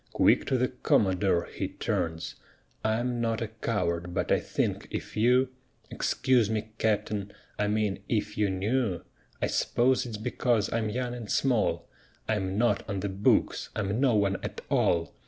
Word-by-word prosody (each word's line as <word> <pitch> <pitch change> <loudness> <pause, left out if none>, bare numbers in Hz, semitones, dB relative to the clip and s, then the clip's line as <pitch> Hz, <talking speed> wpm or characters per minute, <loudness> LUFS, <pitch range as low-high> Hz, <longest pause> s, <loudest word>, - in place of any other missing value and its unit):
Quick - - +4
to 130 - +2
the 125 +1 +1
Commodore 95 -7 +2
he - - -4
turns: 80 0 -2 0.5
"I'm 120 +2 0
not 115 -1 0
a 115 - -3
coward, 90 -6 -2
but - - -1
I - - +4
think - - -2
if - - -5
you 125 +4 +4 0.4
Excuse 125 -5 +2
me, 110 0 -2
Capt'n, 105 -2 0 0.3
I 105 - +2
mean 105 -2 0
if 110 -3 -1
you 105 -1 +1
knew 100 0 0 0.4
(I - - +5
s'pose 125 +1 +2
it's 110 -3 -5
because 115 -1 0
I'm 110 -1 0
young 120 +2 -2
and 120 -4 -7
small) 125 -5 +1 0.4
I'm 95 -3 -1
not 120 +2 +2
on 100 -2 -2
the 100 - -2
books! 95 +2 +1
I'm 105 +1 -1
no 130 -5 +4
one 100 -2 +2
at - - -5
all! 85 -1 +2
110 Hz, 160 wpm, -28 LUFS, 100-120 Hz, 0.5 s, I